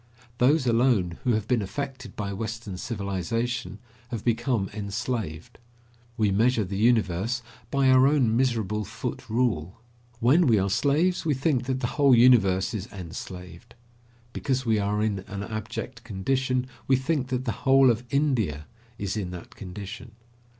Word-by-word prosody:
Those 135 +3 +4
alone 115 -7 +2
who 125 - +2
have 110 -1 -1
been 125 -4 +2
affected 130 +2 -5
by 100 -1 -3
western 110 -1 -5
civilization 105 +2 -3 0.3
have 115 -4 -5
become 120 -3 +1
enslaved. 100 -5 -4 0.6
We 105 -3 +2
measure 115 +3 +3
the 95 +1 -5
universe 115 +1 +1 0.3
by 140 0 +2
our 130 0 +6
own 135 -6 +3
miserable 110 -4 0
foot 120 +4 -6
rule. 110 -6 0 0.4
When 140 +9 +4
we 115 -3 +5
are 95 0 +1
slaves, 150 - +2
we 155 -4 +1
think 130 -2 0
that 130 0 -2
the - - 0 0.2
whole 140 -3 +7
universe 115 -5 +4
is 105 -2 -5
enslaved. 90 +3 -9 0.6
Because 130 -2 -1
we 110 -2 +2
are 105 +1 0
in 105 -3 0
an 100 +1 -5
abject 110 +2 -6
condition, 130 +4 -1 0.2
we 135 - +5
think 130 0 -1
that 130 -1 -2
the 115 - 0
whole 135 -1 +6
of 115 +1 -2
India 120 - 0 0.3
is 100 0 -3
in 100 -4 -3
that 90 -1 -9
condition. 100 +3 -8
115 Hz, 150 wpm, -26 LUFS, 100-130 Hz, 0.6 s, whole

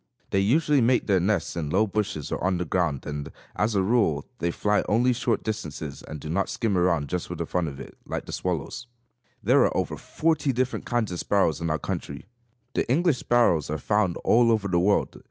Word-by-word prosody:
They 95 - +2
usually 145 +7 +3
make 120 +1 +3
their 95 -3 +3
nests 100 +4 0
in 80 -4 -3
low 100 +7 +3
bushes 105 -8 -3
or - - -3
on 90 0 +1
the 90 - -2
ground 80 -5 -1
and, 75 -1 -5 0.2
as 105 +1 0
a 95 - +3
rule, 95 -9 +2
they 85 - 0
fly 105 +4 +1
only 120 +4 +3
short 120 -1 -1
distances, 80 -8 -5
and 75 - -8
do 75 - -8
not 95 +5 0
skim 110 -5 -1
around 85 -5 +2
just 90 +2 -3
for - - -5
the - - -3
fun 90 -2 -1
of 70 -2 -7
it, - - -10
like - - -4
the - - -8
swallows. 90 - -3 0.6
There - - +5
are - - +1
over - - -1
forty 155 -3 0
different 130 +1 -2
kinds 120 -5 0
of 90 - -4
sparrows 95 -6 +1
in 85 - -1
our 80 - +1
country. 70 +1 -5 0.5
The 120 - 0
English 165 -1 +2
sparrows 115 -11 +2
are 75 - -1
found 100 +2 +1
all 115 0 +4
over 110 -3 +1
the 90 -2 +2
world. 100 +3 +1
100 Hz, 215 wpm, -26 LUFS, 80-115 Hz, 0.6 s, There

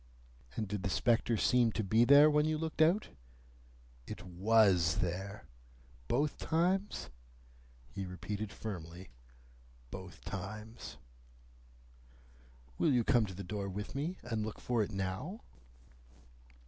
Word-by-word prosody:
"And 110 - -2
did 100 0 -3
the 100 - -1
spectre 115 +3 +2
seem 120 +1 +3
to 110 - -1
be 110 +4 +4
there, 140 +3 +8
when 150 0 +3
you 155 0 +1
looked 160 0 -2
out?" 175 +7 +4 1.0
"It 90 - -7
WAS 95 -3 +4
there." 95 +3 -3 0.6
"Both 145 - 0
times?" 185 +5 0 0.8
He 95 -1 -5
repeated 100 +3 -5
firmly: 90 - -7 0.8
"Both 95 -2 -9
times." 105 +4 -7 1.8
"Will 155 - +4
you 125 -3 +3
come 115 -1 +3
to 95 - -8
the 100 - -6
door 100 +1 -4
with 105 +2 -5
me, 155 +7 -2
and 115 -3 -2
look 110 0 -5
for 120 -2 0
it 105 - -1
now?" 95 - -4
110 Hz, 125 wpm, -33 LUFS, 95-140 Hz, 1.8 s, there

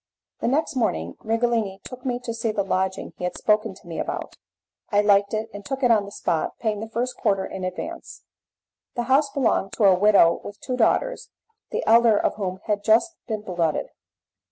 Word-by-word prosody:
The - - -1
next 285 +4 0
morning 85 - -1
Righelini 225 -3 0
took 255 0 -10
me 245 -1 0
to 230 - -3
see 225 -1 -1
the 205 -2 -1
lodging 190 0 -2
he - - -8
had 180 - -2
spoken 215 -1 +1
to 185 - -18
me 165 - -5
about. - - -4 0.5
I 205 0 +3
liked 200 -1 +4
it 220 0 -2
and 205 0 -8
took 270 +4 -4
it 245 - +5
on 210 -3 +3
the 200 - -10
spot, 165 -5 -2
paying 215 -3 -1
the 220 +1 -6
first 245 +3 -2
quarter 195 -4 0
in 190 - -6
advance. 325 - -6 0.7
The 240 - -1
house 275 +4 +3
belonged 240 -8 0
to - - -1
a 195 -2 +7
widow 185 -3 +5
with 205 0 -9
two 255 - -3
daughters, - - +1 0.4
the - - -3
elder 230 -1 +6
of - - +1
whom 190 -2 -4
had 205 -2 -1
just 235 +11 +3
been 215 -3 -3
blooded. 170 -5 -1
215 Hz, 200 wpm, -24 LUFS, 195-240 Hz, 0.7 s, a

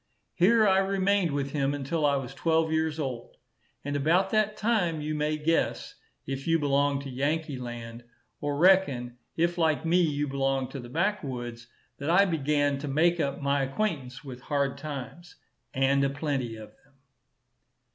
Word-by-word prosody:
Here 215 +5 +4
I 190 0 +4
remained 195 -1 +1
with 140 -1 -2
him 140 -1 0
until 145 +2 0
I 140 - +2
was 135 -2 -4
twelve 160 0 +1
years 160 -1 0
old; 130 -6 -5 0.5
and 145 0 -2
about 170 +7 +2
that 215 -1 +1
time, 205 -8 +1
you 150 +1 -3
may 150 0 0
guess, 165 +2 0 0.3
if 135 +2 -5
you 165 0 +4
belong 140 -1 +1
to 140 - -7
Yankee 145 +1 -1
land, 120 -1 -7 0.4
or 145 -1 -2
reckon, 140 -9 +3 0.2
if 170 +1 +1
like 160 -1 +1
me 175 +2 +3
you 145 -3 0
belong 135 -1 -1
to 135 - -7
the 120 -1 -9
back 190 +8 0
woods, 120 -3 -6 0.3
that 145 +2 -3
I 185 +4 +5
began 145 -4 +1
to 145 - -5
make 170 +5 +2
up 140 -2 -2
my 140 0 +2
acquaintance 135 -3 -3
with 130 -3 -9
hard 140 -1 -1
times, 150 +3 -8 0.4
and 135 +1 +2
a 140 - +2
plenty 140 -5 -2
of 110 -1 -10
them. 135 0 -30
145 Hz, 170 wpm, -28 LUFS, 135-165 Hz, 0.5 s, I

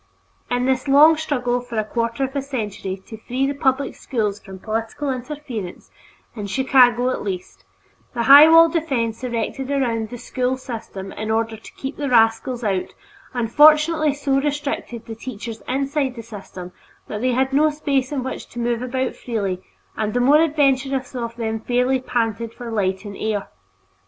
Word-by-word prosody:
In 245 0 0
this 260 +1 0
long 295 +4 +7
struggle 250 -6 -1
for 240 -2 -7
a 215 - +2
quarter 230 +3 -2
of 265 +1 -3
a 280 - 0
century 210 -8 -5
to 220 - -9
free 250 +4 -2
the 280 - 0
public 270 -1 0
schools 210 -5 -2
from 190 -1 -11
political 225 +7 -3
interference, 250 -7 -7 0.4
in 210 -3 -5
Chicago 250 +1 +4
at - - -3
least, 180 - -6 0.5
the 235 - 0
high 285 +5 +9
wall 330 0 +8
of 330 - -3
defense 255 -8 -1
erected 250 +2 -3
around 235 -6 0
the 245 - -7
school 250 +2 -2
system 220 -6 -7
in 215 0 -5
order 225 0 0
"to 220 - -13
keep 270 +2 -6
the 285 -2 -2
rascals 235 +1 +2
out" 195 -4 -1 0.4
unfortunately 305 +5 +4
so 275 -1 +1
restricted 285 -5 -3
the 225 - -7
teachers 225 -1 -7
inside 275 0 -1
the 230 - -8
system 195 -4 -9 0.4
that 210 - -5
they 255 0 +1
had 265 +2 +1
no 305 +3 +4
space 280 -3 -1
in 275 -3 -2
which 260 - -5
to - - -14
move 235 0 -1
about 255 +1 -2
freely 200 -6 -3 0.3
and 215 0 -2
the - - +3
more 285 +5 +5
adventurous 275 -4 +1
of 235 -2 -4
them 225 -1 -2
fairly 250 +3 +1
panted 230 -2 -2
for 240 -2 -7
light 190 -2 -1
and 200 -1 -7
air. 215 -2 -2
245 Hz, 175 wpm, -21 LUFS, 225-275 Hz, 0.5 s, high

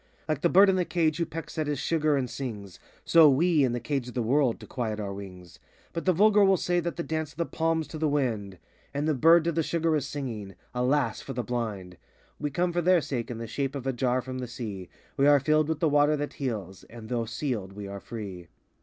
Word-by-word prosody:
Like 155 -2 -1
the 170 - +3
bird 195 +4 +7
in 190 -1 +3
the 180 - +2
cage 160 -3 0
who 170 -1 -1
pecks 165 0 -6
at 155 - 0
his 145 -1 -1
sugar 155 0 +1
and 130 -2 -1
sings, 105 -8 -7 0.3
So 165 -3 +7
we, 155 +2 +3
in 130 - +2
the 120 - -1
Cage 130 +1 -2
of 125 - -9
the 120 - 0
world, 130 0 +2
to - - -10
quiet 110 -5 -3
our 100 -2 -4
wings. 90 -3 -10 0.3
But 165 - -4
the 185 - +5
vulgar 205 +3 +5
will 195 -1 +5
say 175 +1 0
that 170 0 -3
the 170 - -3
dance 160 -2 -3
of - - -30
the 170 - 0
palm 165 0 0
's - - -13
to 155 - -7
the 155 -1 +1
wind, 115 -9 -1
83 - - -26 0.4
And 145 +2 0
the 155 - +3
bird 165 +5 +5
to 170 - 0
the 165 0 0
sugar 165 0 0
is 145 -2 -1
singing—Alas! 125 0 -2
for - - -7
the 125 - -2
blind! 105 -7 -4 0.4
We 150 - -2
come 175 +5 0
for 175 - +1
their 180 0 +4
sake 125 -4 -4
in 120 - -5
the 115 - -5
shape 135 +4 -3
of 135 -2 -5
a 135 - 0
jar 125 0 0
from 130 0 -5
the 125 - -4
Sea; 105 -6 -6 0.3
We 140 0 +4
are 145 -1 +6
filled 155 +2 +2
with 160 -1 -2
the 165 - +4
water 145 +1 +3
that 145 0 -4
heals; 105 -9 -5
and 115 -1 -11
though 115 -1 -1
sealed, 115 -5 -3
we 100 0 -7
are 100 0 -6
free. 95 -6 -8
140 Hz, 255 wpm, -27 LUFS, 115-160 Hz, 0.4 s, bird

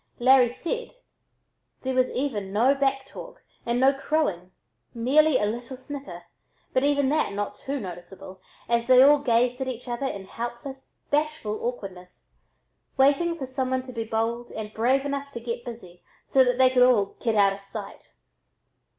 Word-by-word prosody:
Larry 255 0 +5
said, 405 - -5 0.9
there 260 0 -1
was 255 0 +2
even 220 -8 -3
no 235 +7 +4
"back 270 -1 0
talk" - - -11 0.2
and 235 +1 +1
no 265 +2 +5
"crowing, 275 - -1 0.5
merely 275 +5 +4
a 210 - 0
little 235 +4 -4
snicker," 280 +1 -8 0.5
but 255 - +2
even 285 -1 +2
that 305 -8 0
not 205 0 -3
too 280 +1 -4
noticeable, 185 -1 -9 0.3
as 235 0 +1
they 255 -1 +6 0.3
gazed 245 +1 +2
at 265 - -2
each 250 -1 -6
other 240 +3 -2
in 200 -6 -6
helpless, 240 +5 -8
bashful 295 -8 -1
awkwardness, 190 -7 -7 0.6
waiting 290 +5 +3
for 270 - -4
someone 260 0 -2
to 255 -1 -10
be 230 -1 -3
bold 225 +2 -2
and 215 -1 -6
brave 260 +5 +1
enough 280 0 -4
to 235 - -5
"get 235 +1 -5
busy" 185 -8 -10 0.2
so 265 - +4
that 250 -1 +1
they 260 0 +5
could 255 -1 +3
all 235 -6 +4
"get 225 -3 0
out 200 -1 +4
o' 195 - -9
sight." 200 +1 -9
250 Hz, 165 wpm, -25 LUFS, 220-270 Hz, 0.9 s, they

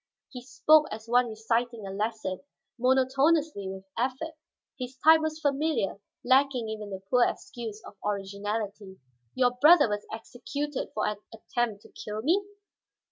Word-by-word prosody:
He 250 - -7
spoke 305 +4 +4
as 220 +1 -7
one 245 +1 +3
reciting 230 0 -1
a 195 - -5
lesson, 210 -2 -3 0.4
monotonously, 265 -1 +2
with 190 0 -8
effort. 265 +7 -2 0.5
His 255 +1 -6
type 320 0 +8
was 315 0 -2
familiar, 285 -8 0 0.2
lacking 260 -3 +3
even 215 -1 -5
the 190 -1 -7
poor 245 +3 +4
excuse 225 -4 -4
of - - -11
originality. 200 0 -4 0.4
"Your 250 -1 +3
brother 295 +5 +6
was 205 -1 -3
executed 260 +5 -5
for 215 - 0
an 210 - -1
attempt 225 -1 -3
to - - -16
kill 215 +1 -6
me?" 355 +9 +3
240 Hz, 140 wpm, -28 LUFS, 210-275 Hz, 0.5 s, type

